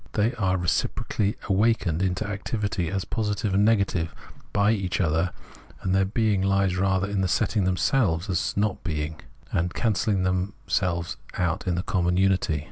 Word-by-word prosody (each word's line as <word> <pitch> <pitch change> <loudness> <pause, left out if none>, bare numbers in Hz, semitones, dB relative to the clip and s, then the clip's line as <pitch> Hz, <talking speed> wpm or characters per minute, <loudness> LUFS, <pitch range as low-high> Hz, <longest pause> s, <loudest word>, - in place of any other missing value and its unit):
They 110 +3 +2
are 95 -5 +1
reciprocally 100 +3 -1
awakened 100 -5 +2
into 95 +2 0
activity 105 -3 -2
as 95 +1 -2
positive 105 -2 -1
and 100 +1 +4
negative 100 -6 +1 0.4
by 100 +1 +3
each 95 -5 -1
other, 85 0 +1 0.5
and 95 - 0
their 95 0 +3
being 105 -1 +1
lies 100 -1 +2
rather 95 0 +1
in 100 -1 -1
their 95 - +1
setting 100 +2 +1
themselves 90 -1 +1
up 100 - -3
as 90 - -1
not 105 -1 0
being, 75 -1 -3 0.3
and 85 +1 0
cancelhng 100 -3 +1
themselves 90 -2 -1 0.5
in 90 - +1
the 90 - -1
common 90 -4 +1
unity. 95 -5 +2
95 Hz, 155 wpm, -25 LUFS, 90-105 Hz, 0.5 s, and